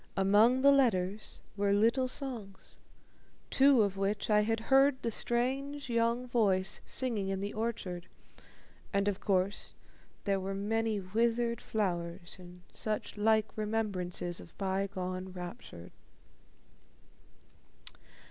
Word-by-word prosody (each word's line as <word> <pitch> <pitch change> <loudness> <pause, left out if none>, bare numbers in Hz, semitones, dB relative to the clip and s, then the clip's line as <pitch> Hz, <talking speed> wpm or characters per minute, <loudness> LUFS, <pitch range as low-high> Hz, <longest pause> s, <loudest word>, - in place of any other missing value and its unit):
Among 210 +6 +5
the 280 +1 +7
letters 215 -7 +1
were 200 -1 +2
little 230 +5 +3
songs, 240 -8 -4 0.7
two 270 -4 +6
of 195 -1 -1
which 200 +2 -1
I 210 0 +5
had 225 +1 0
heard 270 +2 +4
the 230 - 0
strange 265 +5 -1
young 235 +1 +1
voice 200 -6 +2
singing 225 -7 -1
in 195 0 -1
the 200 +1 -4
orchard, 200 -6 -3 0.8
and, 200 0 +1
of 200 -2 0
course, 195 +1 0 0.5
there 195 -2 +1
were 195 +1 -3
many 220 +1 0
withered 235 +4 0
flowers 175 -4 -2
and 180 0 -13
such 215 -1 -1
like 220 0 +2
remembrances 200 -5 -2
of 170 - -15
bygone 190 -1 -2
rapture. 175 - -8
210 Hz, 115 wpm, -32 LUFS, 190-235 Hz, 0.8 s, the